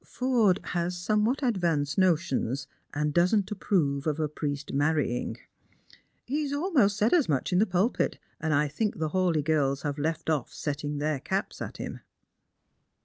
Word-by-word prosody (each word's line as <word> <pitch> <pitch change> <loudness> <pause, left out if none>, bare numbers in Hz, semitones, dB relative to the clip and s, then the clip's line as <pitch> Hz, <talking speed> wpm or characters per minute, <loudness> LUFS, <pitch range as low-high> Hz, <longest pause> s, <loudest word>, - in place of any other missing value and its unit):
Forde 235 -7 +2
has 175 +1 -1
somewhat 215 +9 +1
advanced 170 - +1
notions, 150 -7 +1 0.3
and 150 0 -1
doesn't 185 +4 +2
approve 160 -8 0
of 155 0 0
a 155 - +1
jjriest 145 -1 -4
marrying. 145 -3 0 0.9
He 290 +5 -1
has 290 -2 -2
almost 285 - +2
said 215 +3 +2
as 330 - +3
much 145 +5 0
in 180 - +4
the 215 - +3
pulpit, 185 +7 +1 0.2
and 160 0 -1
I 150 0 +3
think 205 +9 -2
the 155 -1 -1
Hawleigh 175 -4 +1
girls 140 -3 +1
have 145 -1 -2
left 160 +3 -2
off 155 -6 0
setting 145 0 -3
their 150 -1 -1
caps 190 +9 -3
at - - -5
him." - - -6
165 Hz, 160 wpm, -28 LUFS, 145-205 Hz, 0.9 s, in